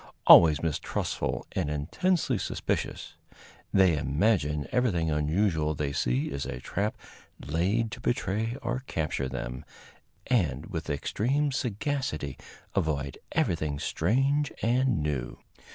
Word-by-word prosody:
Always 80 -3 +8
mistrustful 65 -5 -2
and 75 - -1
intensely 120 - 0
suspicious, - - -3 0.5
they 95 -4 +5
imagine 75 - +1
everything 90 -11 +1
unusual 80 +1 +1
they 70 -1 -2
see 60 +2 0
is 70 0 -3
a - - -5
trap 100 +10 -2 0.4
laid 100 +9 0
to - - -7
betray 115 0 -1
or 125 +2 -2
capture 75 -4 -2
them, 60 0 -5 0.6
and 80 - +1
with 80 -5 -5
extreme 130 - 0
sagacity 120 - -2 0.3
avoid 70 -4 -1
everything 75 -4 0
strange 135 - +1
and 120 - +2
new. 75 -5 -3
80 Hz, 110 wpm, -28 LUFS, 75-115 Hz, 0.6 s, Always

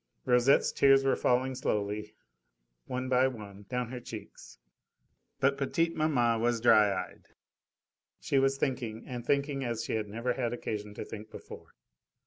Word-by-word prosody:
Rosette's 125 +3 +4
tears 135 -1 +5
were 135 - +3
falling 130 +1 +1
slowly, 105 -3 -2 0.7
one 130 0 -3
by 130 0 +4
one 105 -5 -9
down 125 -1 -2
her 125 - -5
cheeks, 120 - -10 0.8
but 140 +1 +2
petite 165 +4 0
maman 120 -7 +2
was 120 0 +1
dry 110 -3 +5
eyed. - - -5 0.9
She 135 - +1
was 135 0 +2
thinking, 120 -5 -3
and 120 -2 -6
thinking 140 +1 0
as 115 -2 -2
she - - -3
had 110 -1 -1
never 115 +4 -2
had 120 -2 -2
occasion 105 -3 -5
to - - -6
think 110 0 -9
before. - - -12
125 Hz, 150 wpm, -30 LUFS, 110-135 Hz, 0.9 s, tears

